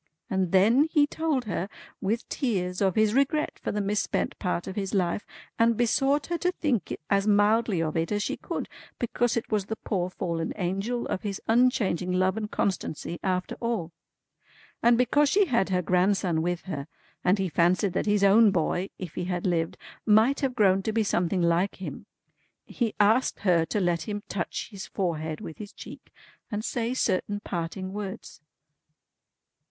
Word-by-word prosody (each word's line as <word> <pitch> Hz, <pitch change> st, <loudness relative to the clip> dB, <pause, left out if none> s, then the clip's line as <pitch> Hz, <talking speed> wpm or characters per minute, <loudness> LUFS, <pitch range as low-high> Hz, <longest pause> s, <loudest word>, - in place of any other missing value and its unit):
And 190 Hz, -3 st, 0 dB
then 225 Hz, +10 st, +5 dB
he 295 Hz, -3 st, +5 dB
told 295 Hz, -4 st, -1 dB
her, 195 Hz, -2 st, -3 dB, 0.3 s
with 220 Hz, +4 st, -1 dB
tears, 185 Hz, -9 st, -1 dB
of 190 Hz, -3 st, +2 dB
his 215 Hz, -1 st, +3 dB
regret 280 Hz, +4 st, +1 dB
for -, -, -3 dB
the 210 Hz, -, -2 dB
misspent 205 Hz, +1 st, -1 dB
part 180 Hz, -2 st, -1 dB
of 190 Hz, -, -6 dB
his 195 Hz, -1 st, -2 dB
life, 180 Hz, +1 st, 0 dB, 0.3 s
and 230 Hz, -1 st, +4 dB
besought 270 Hz, +4 st, +2 dB
her 345 Hz, -1 st, -2 dB
to 360 Hz, -, +1 dB
think 275 Hz, -, -1 dB
as 200 Hz, +1 st, +3 dB
mildly 205 Hz, -3 st, +3 dB
of 155 Hz, -1 st, -3 dB
it 165 Hz, +2 st, 0 dB
as 205 Hz, -1 st, 0 dB
she -, -, -2 dB
could, -, -, -5 dB, 0.3 s
because 240 Hz, 0 st, 0 dB
it 230 Hz, -, -4 dB
was 210 Hz, -3 st, +1 dB
the 220 Hz, -, -3 dB
poor 185 Hz, -4 st, -2 dB
fallen 170 Hz, -3 st, -3 dB
Angel 195 Hz, +6 st, -2 dB
of -, -, -3 dB
his 200 Hz, -2 st, -4 dB
unchanging 225 Hz, -7 st, +2 dB
Love 185 Hz, +1 st, +2 dB
and 215 Hz, -1 st, -3 dB
Constancy 170 Hz, -4 st, -2 dB
after 185 Hz, -1 st, -1 dB
all. 230 Hz, -8 st, -2 dB, 0.9 s
And 235 Hz, 0 st, +5 dB
because 280 Hz, +4 st, +3 dB
she 405 Hz, +4 st, +4 dB
had 235 Hz, -, +1 dB
her 180 Hz, -1 st, +1 dB
grandson 180 Hz, -1 st, +2 dB
with 175 Hz, +1 st, -2 dB
her, 145 Hz, -6 st, -5 dB, 0.4 s
and 180 Hz, +3 st, +3 dB
he 195 Hz, -1 st, 0 dB
fancied 175 Hz, +4 st, +2 dB
that 190 Hz, -, -1 dB
his 205 Hz, -1 st, +2 dB
own 210 Hz, +3 st, +7 dB
boy, 185 Hz, +1 st, 0 dB
if 180 Hz, -4 st, -7 dB
he 180 Hz, -, -3 dB
had 180 Hz, -1 st, -2 dB
lived, 165 Hz, -3 st, 0 dB, 0.3 s
might 220 Hz, +6 st, +4 dB
have 265 Hz, -3 st, -1 dB
grown 195 Hz, -4 st, +4 dB
to 220 Hz, -, -2 dB
be 220 Hz, 0 st, +1 dB
something 180 Hz, -2 st, 0 dB
like 170 Hz, +4 st, +2 dB
him, 185 Hz, -, -8 dB, 0.6 s
he 230 Hz, -3 st, -2 dB
asked 220 Hz, +5 st, +3 dB
her 175 Hz, -4 st, +3 dB
to 210 Hz, -, -1 dB
let 175 Hz, -3 st, 0 dB
him 205 Hz, 0 st, -3 dB
touch 185 Hz, -3 st, -4 dB
his 200 Hz, 0 st, -7 dB
forehead 160 Hz, -5 st, -2 dB
with 160 Hz, -, -8 dB
his 205 Hz, -2 st, -7 dB
cheek -, -, -12 dB, 0.4 s
and 215 Hz, 0 st, -3 dB
say 240 Hz, +1 st, -1 dB
certain 205 Hz, -3 st, 0 dB
parting 185 Hz, +2 st, -4 dB
words." 205 Hz, -6 st, -7 dB
200 Hz, 180 wpm, -27 LUFS, 180-230 Hz, 0.9 s, own